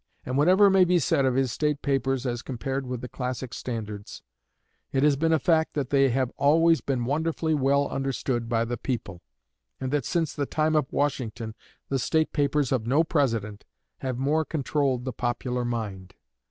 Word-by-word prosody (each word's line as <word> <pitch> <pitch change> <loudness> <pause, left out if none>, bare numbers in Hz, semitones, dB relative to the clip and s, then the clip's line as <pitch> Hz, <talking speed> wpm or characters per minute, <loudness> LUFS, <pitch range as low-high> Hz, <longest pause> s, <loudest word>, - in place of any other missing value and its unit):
And 130 - -3
whatever 185 +8 +5
may 190 -1 +6
be 180 0 +3
said 140 -3 +2
of 130 -1 +1
his 130 -2 +1
state 150 +3 -1
papers 135 -2 0
as 120 -1 -2
compared 135 +1 -4
with 125 -1 -4
the 125 - -5
classic 125 -1 -5
standards, 105 -4 -6 0.7
it 135 - +1
has 150 -1 +5
been 165 +4 +1
a 160 - +5
fact 160 +2 +1
that 140 -4 -2
they 135 -1 +4
have 130 0 0
always 165 +3 +4
been 130 -4 -1
wonderfully 160 +3 0
well 140 0 +2
understood 130 -3 -2
by 115 -1 +1
the 120 +1 -3
people, 110 -8 -4 0.6
and 130 -1 -3
that 145 -4 0
since 165 -4 0
the 140 -2 -2
time 155 0 +1
of 150 -4 +1
Washington 120 -6 -2 0.4
the 135 - 0
state 160 +6 +1
papers 145 -2 +1
of 120 -4 0
no 145 +6 +4
President 115 -10 -1 0.4
have 130 -2 -3
more 145 +5 +1
controlled 140 -4 -1
the 130 - -3
popular 125 0 -2
mind. 105 -6 -4
135 Hz, 180 wpm, -26 LUFS, 120-150 Hz, 0.7 s, may